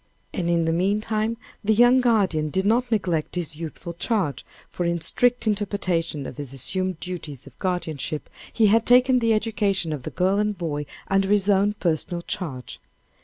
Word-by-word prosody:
And 170 Hz, -2 st, -1 dB
in 170 Hz, -1 st, +2 dB
the 165 Hz, -, +1 dB
meantime 215 Hz, +5 st, 0 dB, 0.3 s
the 220 Hz, +1 st, +3 dB
young 245 Hz, +3 st, +6 dB
guardian 195 Hz, -11 st, +2 dB
did 190 Hz, +5 st, -1 dB
not 240 Hz, +4 st, +2 dB
neglect 180 Hz, -8 st, 0 dB
his 170 Hz, -4 st, -3 dB
youthful 165 Hz, +2 st, -7 dB
charge, 175 Hz, -, -1 dB, 0.3 s
but 175 Hz, -, -1 dB
in 170 Hz, 0 st, 0 dB
strict 245 Hz, +9 st, +2 dB
interpretation 190 Hz, -8 st, -1 dB
of -, -, -8 dB
his 140 Hz, -3 st, -7 dB
assumed 185 Hz, +6 st, -1 dB
duties 160 Hz, -7 st, -7 dB
of -, -, -16 dB
guardianship, 160 Hz, -5 st, -3 dB, 0.2 s
he 225 Hz, -, +3 dB
had 220 Hz, +2 st, +3 dB
taken 250 Hz, +1 st, +6 dB
the 230 Hz, -2 st, +3 dB
education 205 Hz, -6 st, 0 dB
of 145 Hz, -, -5 dB
the -, -, -5 dB
girl 190 Hz, +2 st, +1 dB
and 210 Hz, -1 st, 0 dB
boy 150 Hz, -4 st, -3 dB, 0.2 s
under 195 Hz, 0 st, +1 dB
his 205 Hz, -1 st, +3 dB
own 200 Hz, +1 st, +3 dB
personal 170 Hz, -2 st, -2 dB
charge. 135 Hz, -11 st, -5 dB
185 Hz, 170 wpm, -24 LUFS, 165-215 Hz, 0.3 s, young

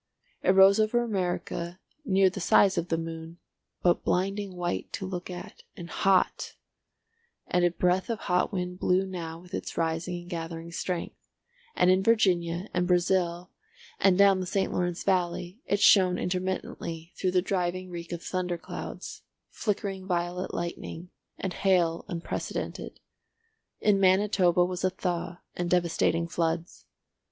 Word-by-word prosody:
It 185 Hz, -, +4 dB
rose 195 Hz, +2 st, +7 dB
over 220 Hz, +3 st, +2 dB
America 180 Hz, -4 st, -3 dB, 0.2 s
near 195 Hz, -6 st, +3 dB
the 195 Hz, -, -6 dB
size 195 Hz, +2 st, +4 dB
of 170 Hz, -, -1 dB
the 165 Hz, -, 0 dB
moon, 165 Hz, 0 st, -6 dB, 0.5 s
but 175 Hz, -1 st, +3 dB
blinding 195 Hz, +1 st, -1 dB
white 175 Hz, 0 st, -3 dB
to 190 Hz, -, -3 dB
look 180 Hz, -1 st, -5 dB
at, 180 Hz, -1 st, -8 dB, 0.2 s
and 175 Hz, -1 st, -8 dB
hot; 195 Hz, -2 st, +1 dB, 0.9 s
and 180 Hz, -, +1 dB
a 175 Hz, -, +5 dB
breath 180 Hz, +3 st, +1 dB
of 230 Hz, -, -2 dB
hot 180 Hz, 0 st, +1 dB
wind 180 Hz, -2 st, -3 dB
blew 185 Hz, +1 st, +2 dB
now 170 Hz, -4 st, -5 dB
with 180 Hz, +2 st, -16 dB
its -, -, -5 dB
rising 165 Hz, +2 st, -1 dB
and 175 Hz, -, -14 dB
gathering 165 Hz, 0 st, -5 dB
strength, 175 Hz, +1 st, -4 dB, 0.5 s
and 180 Hz, -, +4 dB
in 185 Hz, +1 st, +4 dB
Virginia, 185 Hz, -4 st, +2 dB
and 180 Hz, 0 st, +1 dB
Brazil, 180 Hz, -1 st, +1 dB, 0.5 s
and 190 Hz, -2 st, +4 dB
down 200 Hz, -1 st, +6 dB
the 185 Hz, -, -3 dB
St. 195 Hz, +1 st, 0 dB
Lawrence 175 Hz, -1 st, -1 dB
valley, 180 Hz, +2 st, -1 dB
it 200 Hz, -, +1 dB
shone 185 Hz, -3 st, +6 dB
intermittently 180 Hz, -2 st, -3 dB
through 185 Hz, -1 st, -1 dB
a 180 Hz, -, +5 dB
driving 185 Hz, -1 st, -2 dB
reek 170 Hz, 0 st, -7 dB
of 170 Hz, -1 st, -5 dB
thunder 180 Hz, -1 st, -2 dB
clouds, -, -, -7 dB, 0.3 s
flickering 195 Hz, -3 st, -3 dB
violet 175 Hz, 0 st, -1 dB
lightning, 170 Hz, 0 st, -5 dB, 0.3 s
and 190 Hz, -2 st, -3 dB
hail 175 Hz, -4 st, +2 dB
unprecedented. 170 Hz, -4 st, -5 dB, 0.8 s
In 205 Hz, -2 st, +3 dB
Manitoba 185 Hz, -2 st, +4 dB
was 180 Hz, 0 st, -4 dB
a 185 Hz, -, +4 dB
thaw 180 Hz, -2 st, -3 dB
and 175 Hz, -1 st, -2 dB
devastating 170 Hz, -1 st, +1 dB
floods. 170 Hz, 0 st, -2 dB
180 Hz, 145 wpm, -28 LUFS, 175-190 Hz, 0.9 s, rose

